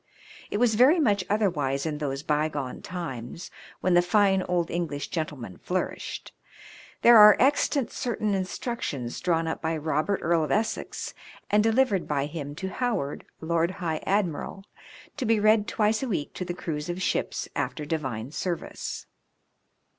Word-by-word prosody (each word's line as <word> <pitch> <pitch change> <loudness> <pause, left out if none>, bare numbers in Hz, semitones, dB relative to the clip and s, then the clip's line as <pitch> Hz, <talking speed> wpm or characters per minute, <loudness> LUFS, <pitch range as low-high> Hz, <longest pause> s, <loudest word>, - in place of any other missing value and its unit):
It - - -1
was 235 0 +3
very 260 +10 +6
much 205 -10 +2
other 210 0 +3
wise 140 -5 -1
in 150 -2 -2
those 140 -1 -3
by 150 +1 +1
gone 140 -4 -5
times 165 -3 -6 0.3
when 185 - +2
the 175 - +6
fine 195 +1 +3
old 175 -2 -1
English 160 -5 -3
gentleman 140 - -5
flourished. 185 +1 -4 0.7
There 235 -1 +9
are 210 0 +9
extant 280 0 +2
certain 215 -4 -1
instruc 195 +6 -3
tions 120 -4 -3
drawn 165 -2 +1
up 160 - -3
by 160 0 -1
Eobert, 155 +5 0
Earl 165 -1 +2
of 155 - -3
Essex, 220 +1 -2 0.4
and 210 +1 +5
delivered 225 -3 +2
by 140 -2 0
him 145 -1 -6
to 190 +4 -4
Howard, 215 - -2 0.2
Lord 165 +1 +1
High 165 -4 -3
Admiral, 195 -1 -1 0.5
to 265 - -2
be 225 -1 +3
read 215 0 +4
twice 215 -1 +1
a 265 - -2
week 165 -9 -2
to 180 - -4
the 175 0 -4
crews 155 -2 -4
of 175 +1 -3
ships 185 - -1
after 140 +2 -2
Divine 130 -6 -3
service. 175 +2 -4
175 Hz, 160 wpm, -27 LUFS, 150-210 Hz, 0.7 s, There